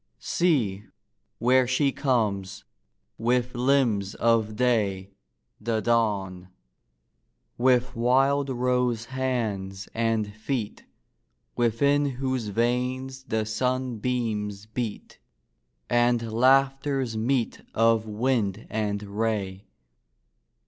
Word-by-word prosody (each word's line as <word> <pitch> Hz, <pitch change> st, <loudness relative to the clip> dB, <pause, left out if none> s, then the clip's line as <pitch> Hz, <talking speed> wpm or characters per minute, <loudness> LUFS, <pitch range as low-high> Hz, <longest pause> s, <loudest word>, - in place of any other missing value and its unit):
See, 115 Hz, -, 0 dB, 0.5 s
where 125 Hz, +2 st, +3 dB
she 135 Hz, +2 st, +2 dB
comes, 110 Hz, -9 st, -1 dB, 0.6 s
with 125 Hz, +2 st, +1 dB
limbs 120 Hz, -6 st, +1 dB
of 115 Hz, -2 st, +1 dB
day, 105 Hz, -5 st, 0 dB, 0.5 s
The 110 Hz, 0 st, -1 dB
Dawn! 100 Hz, -6 st, 0 dB, 1.1 s
with 125 Hz, 0 st, +2 dB
wild 135 Hz, +4 st, +2 dB
rose 125 Hz, -2 st, 0 dB
hands 110 Hz, -7 st, -3 dB
and 115 Hz, -2 st, 0 dB
feet, 110 Hz, 0 st, -4 dB, 0.7 s
Within 140 Hz, +5 st, +2 dB
whose 130 Hz, -4 st, -2 dB
veins 125 Hz, +4 st, -1 dB
the 110 Hz, -4 st, -1 dB
sunbeams 115 Hz, -3 st, -2 dB
beat, 110 Hz, -1 st, -5 dB, 0.7 s
And 120 Hz, -1 st, +2 dB
laughters 135 Hz, 0 st, +2 dB
meet 120 Hz, +2 st, 0 dB
of 115 Hz, -1 st, +3 dB
wind 110 Hz, -2 st, -1 dB
and 105 Hz, -1 st, -2 dB
ray. 100 Hz, -2 st, -3 dB
115 Hz, 85 wpm, -26 LUFS, 105-130 Hz, 1.1 s, where